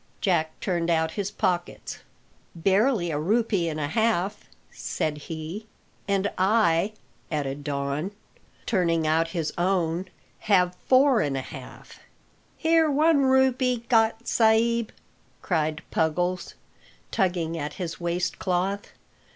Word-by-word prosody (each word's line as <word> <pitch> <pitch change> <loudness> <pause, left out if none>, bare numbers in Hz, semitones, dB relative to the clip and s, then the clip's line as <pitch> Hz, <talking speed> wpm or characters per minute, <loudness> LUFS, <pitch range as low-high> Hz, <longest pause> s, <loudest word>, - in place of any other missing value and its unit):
Jack 160 -5 0
turned 175 -3 -1
out 160 -1 +2
his 200 +2 -3
pockets. 175 -3 -2 0.6
"Barely 195 +2 +2
a 145 - -1
rupee 200 0 +1
and 155 -1 -4
a 150 - -1
half," 210 0 0 0.3
said 150 -1 -3
he, 165 +7 -6 0.4
"And 200 0 +1
I," 195 -1 +3 0.4
added 145 -2 -2
Don, 140 +3 -2 0.6
turning 170 -6 +1
out 160 +1 +2
his 165 -2 -3
own, 175 -1 0 0.3
"have 180 -4 +3
four 260 -1 +5
and 140 -2 -1
a - - -1
half." - - -11 0.6
"Here 325 -1 +3
one 295 0 +4
rupee 260 -2 +2
got, 225 -1 +2
sa'b," 230 0 +3 0.5
cried 155 -3 -1
Puggles, 175 +3 0 0.6
tugging 175 -3 0
at 150 -2 -4
his 170 -3 -5
waist 175 +1 -1
cloth. 190 +2 -1
180 Hz, 120 wpm, -26 LUFS, 160-220 Hz, 0.6 s, four